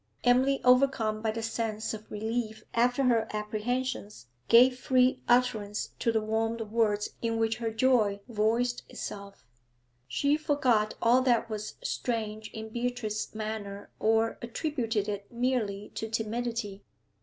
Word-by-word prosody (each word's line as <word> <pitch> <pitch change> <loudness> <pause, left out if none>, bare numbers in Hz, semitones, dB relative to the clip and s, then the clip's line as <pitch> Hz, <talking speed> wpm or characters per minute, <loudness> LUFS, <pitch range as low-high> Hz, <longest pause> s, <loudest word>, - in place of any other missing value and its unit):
Emily, 260 +3 +4
overcome 250 -4 +3
by 220 - 0
the 225 +1 -3
sense 225 -1 -2
of 215 0 -8
relief 220 +1 -3
after 245 +3 +2
her 230 -3 +3
apprehensions, 210 - -3 0.2
gave 250 +2 +6
free 255 -1 +3
utterance 225 -4 +1
to 230 - +2
the 220 -1 +1
warm 225 +1 0
words 210 -2 +1
in 230 -1 0
which 225 -1 +1
her 230 -1 -2
joy 225 -3 +2
voiced 235 +2 +1
itself. 200 -5 -8 0.6
She 285 - +1
forgot 255 -8 +1
all 240 +2 +5
that 235 -3 +2
was 215 0 -5
strange 220 - -3
in 220 +1 -7
Beatrice's 235 -3 -3
manner 215 -2 -5
or 225 +1 +2
attributed 235 -4 -2
it 200 -1 -5
merely 235 -5 -1
to 220 - -4
timidity. 225 -2 -3
225 Hz, 130 wpm, -29 LUFS, 215-245 Hz, 0.6 s, gave